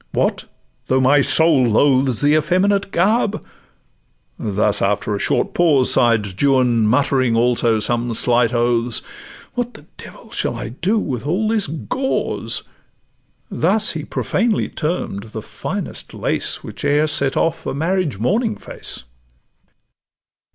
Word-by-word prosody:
'—'What, - - 0 0.4
though 130 - +2
my 135 +2 +4
soul 145 0 +4
loathes 130 +1 +3
The 145 +1 +4
effeminate 190 +6 +1
garb?'—thus, 175 - -3
after 105 +1 0
a - - -4
short - - 0
pause, 150 -7 +3
Sigh'd 105 -5 +1
Juan, 125 -5 +3
muttering 130 0 +2
also 120 -1 +2
some 120 +2 0
slight 120 0 +2
oaths, 120 -1 0 0.5
'What 245 -1 -3
the 150 - -14
devil - - -13
shall - - -2
I - - -5
do 180 - -1
with 130 - -3
all 190 +8 0
this 220 -3 +1
gauze?' 255 - -2 0.9
Thus 195 +4 +2
he 155 -2 -5
profanely 220 +7 -1
term'd 150 - -3
the 110 - -5
finest - - -6
lace - - -1
Which - - -8
e'er 145 +2 +2
set 140 -3 +1
off 165 0 -1
a - - -2
marriage 165 - -1
morning 215 - 0
face. - - -8
140 Hz, 130 wpm, -19 LUFS, 120-180 Hz, 0.9 s, my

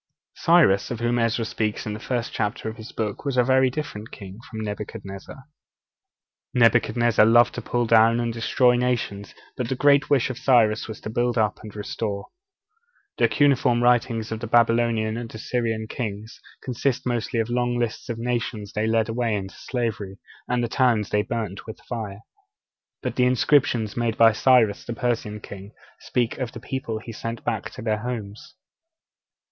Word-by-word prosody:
Cyrus, 165 - +4
of 120 - -4
whom 120 +1 +1
Ezra 115 0 +1
speaks 110 -1 -2
in 105 - -3
the 105 - -6
first 120 0 -3
chapter 105 0 -2
of 110 - -5
his 110 +1 -10
book, 105 -3 -4
was 140 -3 -2
a 125 - +5
very 130 +1 +4
different 125 -6 -6
king 100 0 -10
from 110 -2 -6
Nebuchadnezzar. 105 +2 -7 1.1
Nebuchadnezzar 120 -1 +4
loved 120 +2 +5
to - - -5
pull 120 -1 -1
down 115 +1 +5
and 120 -1 -1
destroy 125 +2 +3
nations; 120 -5 -2 0.2
but 125 -2 -3
the 130 - 0
great 145 +2 +4
wish 135 -3 +2
of 130 - -8
Cyrus 115 -5 +3
was 110 - -8
to 110 - -6
build 120 +1 0
up 105 -2 +1
and 105 -1 -10
restore. 105 -1 -4 0.9
The - - +5
cuneiform 130 -4 +3
writings 115 -2 +2
of 110 - -3
the 120 - -5
old - - -17
Babylonian 115 -1 +3
and 115 -1 -6
Assyrian 115 -1 -2
kings 110 -2 -6 0.2
consist 125 +1 -1
mostly 120 0 -1
of 115 +1 -1
long 120 0 0
lists 120 +1 -3
of 115 - -3
the 115 - -6
nations 115 -4 -3
they 105 +1 0
led 110 -1 +2
away 115 -1 -1
into 95 -1 -5
slavery 110 -6 -4 0.3
and 125 0 0
the - - 0
towns 115 -4 +1
they 105 - +3
burnt 105 -3 -4
with 110 - -8
fire; 110 -4 -6 0.8
but - - -3
the 125 - +4
inscriptions 125 -4 +2
made 115 -2 -1
by 115 -1 +7
Cyrus, 115 -2 +3
the 120 - -5
Persian 115 -3 -2
king, 100 +1 -10 0.3
speak 120 +1 -1
of 125 -3 -3
the - - -7
people 130 -3 -4
he 115 +2 -8
sent 115 +1 -5
back - - -2
to - - -8
their 110 -2 0
homes. 110 -3 -6
115 Hz, 180 wpm, -24 LUFS, 110-120 Hz, 1.1 s, by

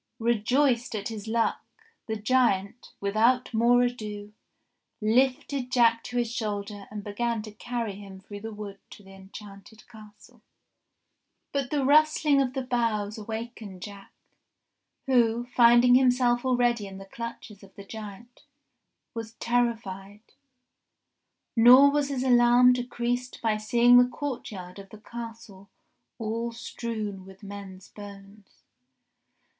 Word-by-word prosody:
Rejoiced 235 +2 +1
at 205 0 -4
his 220 -2 -7
luck 230 +1 0 0.4
the 220 - -2
giant, 220 -2 0
without 230 +6 +1
more 240 +2 +4
ado, 210 -4 -5 0.7
lifted 255 +3 0
Jack 230 -2 +3
to 245 - -5
his 240 -2 0
shoulder 205 -3 -4
and 210 -1 -7
began 225 +2 -2
to 215 - -9
carry 230 0 -4
him 195 -2 -11
through 205 +1 -10
the 225 +2 -7
wood 205 -2 -8
to 205 - -14
the 195 0 -15
enchanted 195 +2 -13
castle. 215 -3 -17 1.1
But 275 -3 -2
the 285 -3 0
rustling 300 0 +4
of 260 -2 -1
the 265 -1 -3
boughs 225 -4 -1
awakened 220 -3 -7
Jack, 200 -1 -10 0.9
who, 240 -2 +2
find 240 0 +5
ing 245 - +6
himself 250 -1 +3
already 240 -4 +1
in 190 0 -10
the 195 - -10
clutches 230 -1 -9
of 195 -1 -17
the 200 - -11
giant, 220 +3 -10 0.7
was 225 -1 -7
terrified; 220 -5 -2 1.3
nor 250 +4 +8
was 290 -1 0
his 265 -2 -2
alarm 245 0 +5
decreased 245 0 -3
by 220 -2 0
seeing 240 +3 +5
the 245 0 +4
courtyard 210 -10 -6
of 195 0 -12
the 215 - -12
Castle 225 -3 -10 0.5
all 230 +1 -3
strewn 220 -4 -6
with 190 +2 -15
men's 195 -2 -10
bones. 200 0 -14
230 Hz, 130 wpm, -26 LUFS, 205-245 Hz, 1.3 s, nor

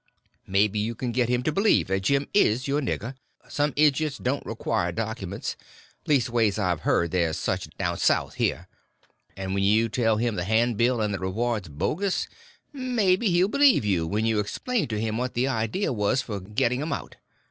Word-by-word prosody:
Maybe 100 +2 +2
you 115 +3 -2
can 125 +2 -3
get 120 0 +1
him 125 0 +1
to 155 - +1
believe 200 +7 +3
that 95 0 +1
Jim 140 +8 +1
is 130 - +3
your 145 +2 +1
nigger—some 135 +4 -4
idiots 150 0 +2
don't 135 +3 -2
require 110 -5 -1
documents—leastways 110 - -2
I've 90 -6 0
heard 85 +2 +1
there's 85 -3 0
such - - -2
down - - -2
South - - +2
here. - - -1 0.7
And 95 0 -4
when 100 0 0
you 110 +3 +3
tell 115 -1 +1
him 115 -2 -1
the 90 - -1
handbill 115 +3 +2
and 105 -1 0
the 95 - -3
reward's 105 0 -2
bogus, 180 - -1 0.5
maybe 235 -6 +1
he'll 180 +1 +3
believe 275 - +4
you 90 -5 +1
when 105 +5 -1
you 110 -2 +1
explain 225 - -2
to 110 -2 -3
him 110 +1 -2
what 125 0 -3
the 125 +3 +1
idea 130 - -1
was 115 +4 +1
for 105 -5 -5
getting 110 +6 -1
'em 155 - -2
out. - - -7
115 Hz, 175 wpm, -25 LUFS, 105-140 Hz, 0.7 s, believe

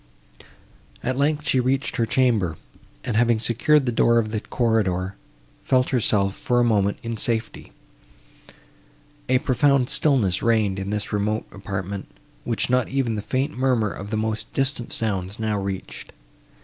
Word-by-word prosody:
At 130 +1 -1
length, 150 +2 0
she 130 - +3
reached 130 +2 0
her 115 - +1
chamber, 110 -10 +1 0.5
and, 115 - -2
having 120 0 +3
secured 130 +6 +2
the 120 - 0
door 115 0 +3
of 110 -2 +1
the 110 - -1
corridor, 100 -6 0 0.5
felt 130 -1 +2
herself, 105 -5 +2
for 120 0 0
a - - +4
moment, 100 -4 +2
in 115 -1 -4
safety. 115 +1 -2 1.6
A 130 - +5
profound 135 0 +2
stillness 110 - +2
reigned 110 -4 +2
in 95 0 -4
this 105 0 -3
remote 105 +1 0
apartment, 100 -1 -5 0.4
which - - -1
not 125 -1 +1
even 130 -4 0
the 105 - -3
faint 135 +7 -2
murmur 125 -5 +1
of 100 +2 -7
the 110 - -1
most 110 0 -3
distant 135 -3 -1
sounds 100 -2 -3
now 110 -2 -1
reached. 95 -1 -6
115 Hz, 150 wpm, -23 LUFS, 100-130 Hz, 1.6 s, A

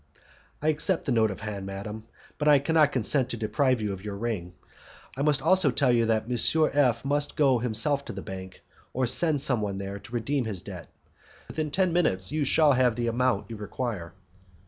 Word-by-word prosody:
"I 155 - +2
accept 155 +4 0
the - - -1
note 110 -2 +3
of 95 - -7
hand, 100 -3 -5
madam, 105 +3 -7 0.3
but 150 - -1
I 145 -1 +7
cannot 150 +1 +2
consent 130 +1 +1
to 120 - -4
deprive 120 +3 0
you 105 -2 -2
of 95 0 -9
your 105 -2 -6
ring. 100 -6 -4 0.6
I 135 - -4
must 145 -2 +2
also 185 -6 +4
tell 130 0 +2
you 115 -2 +2
that 110 -1 +1
M. 140 +6 +3
F 135 -3 +2
must 145 +1 -1
go 135 -5 +3
himself 125 +5 0
to - - -7
the 95 - -7
bank, 95 -1 -9 0.3
or 130 0 0
send 150 +3 +2
some 125 -5 +2
one 100 -2 -3
there, 100 0 -6
to - - -15
redeem 125 +3 -1
his 100 -5 -4
debt. - - -9 0.6
Within 155 -1 -3
ten 180 +3 0
minutes 95 - +1
you 155 -1 -1
shall 150 +1 +4
have 125 -3 +2
the 120 0 -2
amount 120 +1 0
you 115 - -6
require." 105 -5 -5
125 Hz, 205 wpm, -26 LUFS, 105-145 Hz, 0.6 s, I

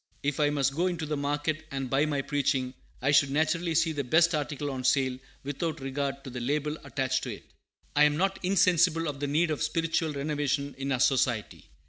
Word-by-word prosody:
If 145 0 -1
I 145 -1 +4
must 140 -2 +1
go 170 +5 +1
into 175 -3 -2
the 150 0 -2
market 145 +2 -1
and 135 -1 -3
buy 140 +4 +2
my 145 -2 -1
preaching, 135 -3 0 0.3
I 140 - +3
should 145 -1 +5
naturally 160 +3 0
seek 160 -1 +2
the 140 - 0
best 165 +6 +4
article 145 -1 -2
on 130 -1 -5
sale, 130 -1 +2 0.2
without 145 +4 -3
regard 135 0 -3
to 130 - -8
the 125 - -5
label 150 +4 -1
attached 130 -1 -1
to 120 -5 -4
it. - - -16 0.5
I 150 +1 +6
am 150 0 +2
not 195 +2 0
insensible 180 -3 +3
of 145 -2 -4
the 145 - -2
need 155 +3 +2
of 150 - -2
spiritual 165 -1 0
renovation 140 -1 -1
in 135 0 -2
our 130 - +1
Society. 120 -4 +1
145 Hz, 205 wpm, -28 LUFS, 135-155 Hz, 0.5 s, I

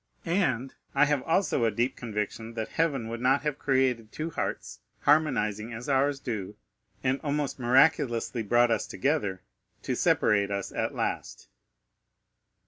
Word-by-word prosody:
And 135 - 0 0.2
I 145 +2 +6
have 145 -2 +1
also 165 -4 +1
a 115 - +4
deep 120 +4 -1
conviction 110 0 -4
that 110 -1 -3
heaven 140 -8 0
would 115 +1 -5
not 135 +3 +3
have 150 -1 -2
created 130 -5 +1
two 160 +2 -4
hearts, - - -4 0.2
harmonizing 120 -8 +2
as 115 +2 -7
ours 140 0 +2
do, 105 -6 -4 0.5
and 130 +1 +1
almost 145 -2 -2
miraculously 125 -2 +3
brought 120 +3 +3
us 110 -2 0
together, 130 -10 -1 0.4
to - - -1
separate 100 -1 +2
us 100 -1 -3
at - - -2
last." - - -4
125 Hz, 140 wpm, -28 LUFS, 110-145 Hz, 0.5 s, I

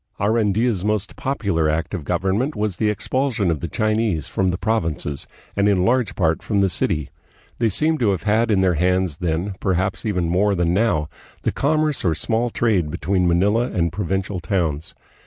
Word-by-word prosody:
Arandia's 110 -1 +1
most 105 -1 -1
popular 100 - 0
act 80 +3 -2
of 90 -6 -3
government 95 - 0
was 105 -3 -2
the 110 - +1
expulsion 115 -1 0
of 80 - -1
the 85 - -4
Chinese 110 -4 0
from 95 - 0
the 90 0 0
provinces, 80 - -1 0.3
and 100 +1 +3
in 95 -2 +2
large 125 0 +1
part 80 -4 +1
from 105 -3 0
the 100 -1 +3
city. 85 -4 -1 0.5
They 115 -1 +2
seem 155 - +1
to 115 - +2
have 95 -4 -1
had 110 +2 +2
in 100 -3 +3
their 95 -1 +3
hands 90 -1 +1
then, 85 +3 -2
perhaps 95 +1 -1
even 90 -6 0
more 100 +4 +2
than 85 -1 +1
now, 95 -7 +1 0.4
the - - +1
commerce 155 -1 +1
or 85 -4 +2
small 115 +9 0
trade 105 -9 +1
between 90 +3 0
Manila 105 +8 +2
and 85 -2 -1
provincial 95 0 -2
towns. 85 -5 -2
95 Hz, 180 wpm, -21 LUFS, 85-110 Hz, 0.5 s, and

